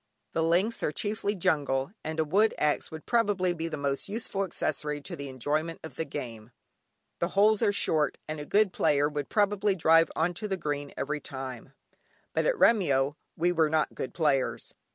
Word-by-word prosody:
The 165 - +1
links 180 +8 +2
are - - 0
chiefly 205 +4 -2
jungle, 140 -6 0
and 160 +1 -4
a - - +4
wood 205 +8 +3
axe 150 -1 +1
would 160 -1 -9
probably 205 -6 +2
be 165 -1 -4
the 160 -2 -4
most 140 +4 -2
useful 205 -2 -2
accessory 150 -4 -2
to 145 - -7
the 140 -1 -6
enjoyment 150 +6 -2
of 160 - -9
the 160 - -2
game. 115 -5 -7 0.7
The 170 - +1
holes 210 +1 +5
are 215 -3 +4
short, 155 -6 +1
and 155 0 -4
a 150 - -6
good 205 -2 +3
player 145 0 +3
would 145 -2 -4
probably 205 -1 +2
drive 165 -1 +5
on 170 +2 +1
to 210 +5 -4
the 190 -2 -2
green 145 -3 -3
every 150 +2 -2
time, 130 -2 -7 0.6
but - - +1
at - - +3
Remyo 145 - +3 0.2
we 175 +2 +2
were 160 -3 +2
not 155 0 +1
good - - -5
players. 145 -6 0
160 Hz, 190 wpm, -28 LUFS, 145-195 Hz, 0.7 s, holes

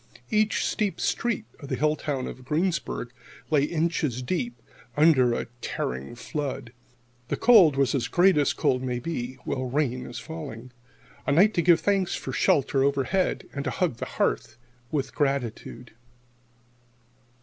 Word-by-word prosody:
Each 215 0 +2
steep 205 -3 -1
street 235 -2 -1
of 140 - -9
the - - 0
hill 150 0 +2
town 140 -4 -3
of 130 - -8
Greensburg 150 -4 -1 0.4
lay 145 -2 +4
inches 155 -6 -1
deep 185 - -2 0.4
under 135 -6 +5
a - - -2 0.2
tearing 65 - -4
flood. 135 -2 -5 0.5
The - - -2
cold 200 - +6
was 135 -1 +2
as 135 -4 0
great 185 +2 +4
as 145 -1 +3
cold 125 -1 +1
may 125 -1 -2
be 125 -2 -4
while 130 -1 -2
rain 130 -2 -1
is 120 - -8
falling. 125 -2 -8 0.6
A - - +3
night 195 +9 +5
to 170 - +2
give 170 0 +5
thanks 195 -3 +1
for - - -5
shelter 135 -1 +2
overhead, 140 +7 0
and 140 - -3
to 135 - -1
hug 130 0 -1
the - - -4
hearth 110 - 0 0.3
with 140 -1 -2
gratitude. 135 -4 -2
140 Hz, 150 wpm, -26 LUFS, 125-170 Hz, 0.6 s, cold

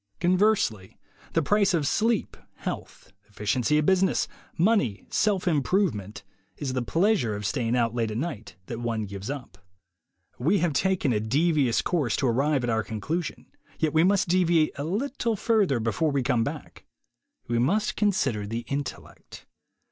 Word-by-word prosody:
Conversely, 180 - +1 0.4
the 165 - +2
price 200 +2 +3
of 155 -4 0
sleep, 225 - +1 0.2
health, - - -7 0.2
efficiency 115 +8 0
at 150 - +2
business, 190 +1 +2 0.3
money, 170 - +2
self 205 -4 +1
improvement, 145 - 0 0.3
is 135 -3 -3
the 130 - 0
pleasure 165 - +1
of 105 0 -5
staying 120 +1 0
out 115 -2 +1
late 115 -2 -1
at 110 - -4
night 115 -8 -5
that 115 +3 -6
one 115 -2 -2
gives 100 +2 -7
up. 125 -10 -7 0.8
We 165 +11 +2
have 170 -3 +1
taken 180 -3 +1
a 105 - +1
devious 140 +2 +2
course 145 -11 0
to 135 - 0
arrive 135 +3 +1
at 120 - -1
our 110 0 +1
conclusion, 145 - -4 0.3
yet 155 -2 0
we 160 +1 +4
must 195 +1 +3
deviate 170 -3 +3
a 140 - -4
little 235 - -1
further 205 - +2
before 115 +8 0
we 140 -2 0
come 125 -3 +2
back. - - -7 0.6
We 120 0 0
must 200 - +1
consider 135 - 0
the 115 +2 -4
Intellect. 140 +1 -6
145 Hz, 155 wpm, -26 LUFS, 115-185 Hz, 0.8 s, we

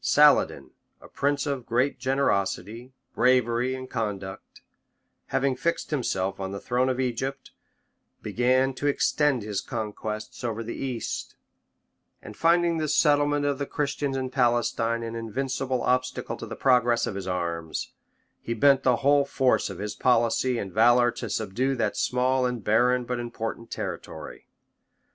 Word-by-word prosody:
Saladin, - - +4 0.3
a - - -14
prince 145 0 -1
of 140 -4 -2
great 125 +3 +1
generosity, 120 -2 -1 0.2
bravery, 125 0 +2
and 130 0 -7
conduct, 100 -6 -5 0.7
having 135 -1 +1
fixed 165 +6 -2
himself 100 -9 -1
on 95 0 -4
the 100 - -5
throne 125 +3 0
of 130 0 -1
Egypt, 130 +2 -3 0.7
began 130 +2 +2
to 145 +3 -3
extend 145 -3 +2
his 105 -2 -3
conquests 110 +3 -5
over 115 -1 -2
the 115 - -5
East; 130 -4 -4 0.8
and 105 - -11
finding 170 +2 +3
the 155 - -1
settlement 145 -1 +3
of 140 -1 0
the 140 - -2
Christians 140 -1 -2
in 130 -1 -3
Palestine 120 -2 +1
an 115 0 -5
invincible 130 +2 -2
obstacle 125 0 -1
to - - -8
the - - -6
progress 125 -3 +3
of - - -3
his 95 -1 -6
arms, 85 -3 -3 0.5
he 115 - -3
bent 135 +3 +5
the 125 -2 +3
whole 145 0 +5
force 130 -4 +1
of 95 - -7
his 105 +2 -4
policy 120 +1 +2
and 95 -5 -5
valor 120 +2 +5
to 120 -1 -6
subdue 110 +7 -1
that 120 - -1
small 125 0 +1
and 125 -3 -4
barren, 125 +4 +3
but 125 0 -3
important 115 -1 -5
territory. - - -7
125 Hz, 150 wpm, -26 LUFS, 115-135 Hz, 0.8 s, bent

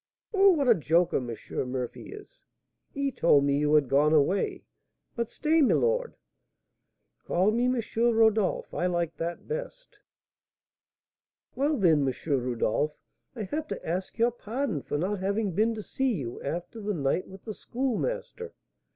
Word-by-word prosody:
"Oh, 395 -1 +6
what 285 -5 0
a 235 - +8
joker 170 -1 +2
M. 120 -3 -4 0.4
Murphy 125 -2 -5
is! 420 +4 -13 0.5
He 280 -1 -1
told 150 - +4
me 140 0 +2
you 150 0 +1
had 150 -3 +4
gone 145 +4 +3
away. 155 +6 +1 0.5
But 235 -1 -2
stay, 315 +5 +2
my 270 - +4
lord - - 0 0.5
" - - -52
"Call 185 +4 +2
me 240 +3 +1
M. 250 -1 +1 0.2
Rodolph; 225 -3 +2
I 180 - 0
like 170 -2 -1
that 170 +1 -5
best." - - -6 1.5
"Well, 290 +2 +1
then, 160 - +3
M. 130 - 0
Rodolph, 130 +2 0 0.4
I 225 - -4
have 305 +10 -4
to - - -6
ask 180 +3 -3
your 235 +1 +3
pardon 235 - -3
for 145 - -3
not 190 +6 -1
having 200 +2 -1
been 220 +6 +1
to 215 - -6
see 265 0 -1
you 125 -8 -5
after 175 +9 -5
the 205 -1 -2
night 145 +4 0
with 190 0 -13
the 215 - -4
Schoolmaster. 450 - -3
205 Hz, 160 wpm, -28 LUFS, 155-260 Hz, 1.5 s, a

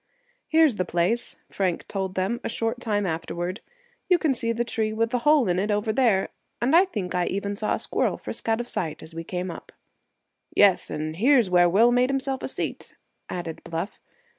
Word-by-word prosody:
"Here's 315 -8 +4
the 185 - +1
place," 175 +7 -1 0.2
Frank 185 -4 -1
told 190 -2 -3
them, 195 +6 -1
a - - -2
short 225 +1 -2
time 210 -4 -1
afterward. 175 +2 -3 0.5
"You 360 - +6
can 315 -5 +1
see 230 -2 -1
the 230 +1 0
tree 220 -2 -1
with 225 +1 0
the 250 - +1
hole 295 -1 +4
in 180 0 +1
it 205 +3 -1
over 210 +1 0
there, 225 -7 +2 0.3
and 260 +6 +2
I 360 +3 +7
think 200 - -4
I 180 -1 +1
even 200 +1 -2
saw 210 +1 0
a - - -3
squirrel - - 0
frisk - - -4
out 225 +1 +2
of 240 - -4
sight 160 -9 -4
as 160 - -10
we 165 0 -5
came 180 +1 -4
up." - - -10 0.8
"Yes, 200 -3 +5
and 155 +1 -4
here's 240 -2 +4
where 175 -1 +5
Will 225 +7 +5
made 250 +1 +3
himself 270 0 -1
a - - -3
seat," - - -5 0.3
added 170 -3 -5
Bluff. 170 +4 -5
210 Hz, 205 wpm, -25 LUFS, 180-240 Hz, 0.8 s, I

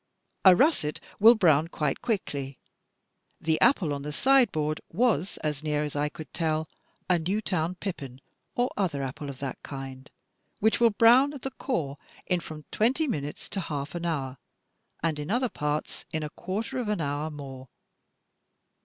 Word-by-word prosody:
A 185 -2 +9
russet 180 - +2 0.2
will 225 +3 +9
brown 160 -7 +4
quite 150 -4 -2
quickly. 140 - -2 0.8
The 160 0 0
apple 195 - +4
on 140 - -4
the 150 +1 -4
sideboard 160 - +3
was, 215 - +1
as 150 -2 -1
near 150 -1 0
as 150 -1 -4
I 145 +1 +1
could 155 -2 -10
tell, 160 -1 0 0.4
a 180 -2 +3
Newtown 180 -1 -1
pippin 140 -10 -6 0.4
or 245 +1 +1
other 165 -9 0
apple 135 +2 -5
of 135 - -7
that 135 -2 -4
kind, 135 -1 -8 0.5
which 220 +2 +2
will 235 -1 +6
brown 240 +6 +6
at 270 - -9
the 270 - -3
core 150 - -3 0.3
in 180 -1 +2
from 155 -3 -9
twenty 265 +8 +2
minutes 150 - -3
to 195 - -3
half 145 -5 -4
an 175 0 -3
hour, 135 -5 -2 0.6
and 160 -3 0
in 150 - -5
other 245 +3 +1
parts 150 -3 -3
in 155 -1 -2
a 150 - -5
quarter 220 +11 -3
of 235 -4 -2
an 210 - 0
hour 145 0 -1
more. 135 -3 -9
160 Hz, 165 wpm, -28 LUFS, 145-210 Hz, 0.8 s, A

